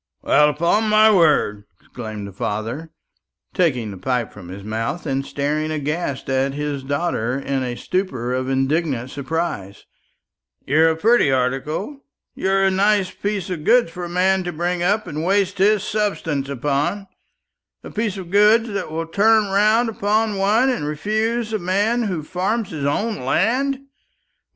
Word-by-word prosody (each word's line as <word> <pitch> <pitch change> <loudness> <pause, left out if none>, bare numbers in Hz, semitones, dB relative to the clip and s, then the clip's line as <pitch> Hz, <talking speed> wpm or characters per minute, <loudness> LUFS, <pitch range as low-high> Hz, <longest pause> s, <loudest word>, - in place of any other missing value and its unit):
"Well, 150 0 +4
upon 170 +9 +1
my 215 +1 +6
word," 150 - +3
exclaimed 110 -4 -7
the 100 - -8
father, 110 - -4 0.6
taking 125 - +1
the 95 - -8
pipe 125 -1 -2
from 95 -4 -11
his 95 +2 -9
mouth, 115 - -3
and 135 -2 -1
staring 150 +3 -2
aghast 150 -1 -3
at 135 +1 0
his 145 -1 -3
daughter 135 -3 -1
in 135 -1 -2
a 125 -1 -3
stupor 130 -11 -2
of 130 0 -2
indignant 135 -1 0
surprise, 140 - -4 0.8
"you're 160 +4 +4
a 160 - 0
pretty 220 - +3
article; 135 - -2 0.3
you're 195 0 +1
a 195 - +3
nice 195 0 +2
piece 195 0 -3
of 165 -4 -4
goods 240 -2 +4
for 175 +1 -6
a - - -7
man 185 +2 +2
to 175 - -2
bring 175 +2 -2
up 205 +4 +1
and 155 -3 -4
waste 195 +1 +1
his 205 +1 +3
substance 165 -11 -2
upon 145 +9 -1 0.8
a - - -9
piece 215 -2 -2
of 180 -2 -8
goods 215 +3 +5
that 200 -5 -3
will 165 +1 -3
turn 210 +4 +3
round 215 +4 +3
upon 215 0 0
one 215 +7 +3
and 150 -12 -2
refuse 215 +8 -1
a 215 - 0
man 205 +7 +1
who 185 -8 -2
farms 195 +7 -2
his 150 -4 -4
own 210 +10 -1
land. 260 - +1
170 Hz, 160 wpm, -21 LUFS, 140-205 Hz, 0.8 s, my